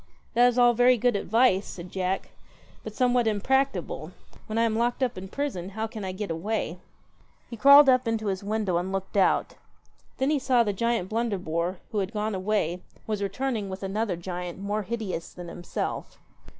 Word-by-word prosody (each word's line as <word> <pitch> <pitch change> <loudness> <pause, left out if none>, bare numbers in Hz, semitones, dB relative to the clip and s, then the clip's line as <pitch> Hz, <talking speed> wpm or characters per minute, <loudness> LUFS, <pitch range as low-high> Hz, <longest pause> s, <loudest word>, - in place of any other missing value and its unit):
'That 245 +1 +6
is 245 0 +1
all 240 -1 +6
very 245 +1 +5
good 245 0 +2
advice,' 205 -1 +2
said 175 0 -8
Jack, 190 0 -2 0.5
'but 215 -1 -8
somewhat 245 -1 +2
impracticable. 210 - 0 0.4
When 215 - -3
I 230 - +4
am 225 -1 +1
locked 240 +3 0
up 250 -2 0
in 185 - -7
a - - -8
prison, 195 -7 -3
how 220 - 0
can 220 -2 -7
I 190 - -3
get 195 0 -4
away? 180 0 -2 0.7
He - - -4
crawled 280 +5 +8
up 255 -2 +4
into 225 -1 -1
his 195 -1 -2
window 205 -3 0
and 180 +2 -2
looked 195 +1 -4
out 195 - +2 0.6
Then 265 +3 +1
he 300 - +2
saw 255 -2 +3
the 205 -2 -1
giant 230 -2 0
Blunderbore, 185 -6 -1
who 215 - 0
had 195 +2 -2
gone 215 0 -1
away, 185 -3 -1 0.2
was 210 -2 -2
returning 210 +1 -2
with 190 +1 -6
another 200 0 -1
giant 175 0 -5
more 205 +2 -2
hideous 205 -5 -4
than 175 -1 -8
himself. 175 +1 -5
210 Hz, 190 wpm, -26 LUFS, 185-235 Hz, 0.7 s, crawled